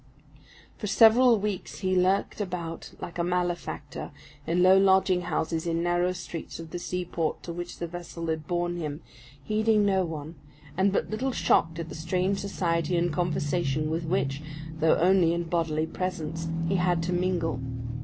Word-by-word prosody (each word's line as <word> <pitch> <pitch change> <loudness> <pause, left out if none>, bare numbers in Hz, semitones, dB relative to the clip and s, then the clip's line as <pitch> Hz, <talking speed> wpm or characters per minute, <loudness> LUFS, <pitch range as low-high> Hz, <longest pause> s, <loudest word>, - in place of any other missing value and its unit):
For 210 - -3
several 230 +4 +6
weeks 205 -2 -4
he 185 -1 +1
lurked 190 +3 +2
about 175 -4 -5
like 175 - -7
a - - +2
malefactor, 175 0 -2 0.4
in 175 +2 +2
low 185 +1 +7
lodging 190 -1 +4
houses 165 -1 -2
in 165 0 0
narrow 175 +1 +2
streets 175 -2 -6
of 165 -1 -9
the 175 - -4
seaport 175 -3 -2
to 170 - -5
which 175 +1 -6
the 170 - -3
vessel 170 0 -7
had 160 -2 -2
borne 175 0 -1
him, 150 -1 -4 0.4
heeding 215 +1 +2
no 190 -2 +3
one, 160 -2 -5 0.4
and 190 +2 +3
but 195 - -1
little 255 +5 -1
shocked 165 -8 +2
at 165 -1 -5
the - - -7
strange 180 +4 0
society 170 -3 0
and 170 -1 +1
conversation 155 -3 0
with 165 +1 -2
which, 145 -5 0 0.4
though 160 0 +4
only 175 -1 +4
in 170 - -1
bodily 165 -2 0
presence, 165 -2 -4 0.2
he 190 +2 +2
had 175 -1 +1
to 180 +2 -1
mingle. 175 -6 0
175 Hz, 165 wpm, -27 LUFS, 165-185 Hz, 0.4 s, low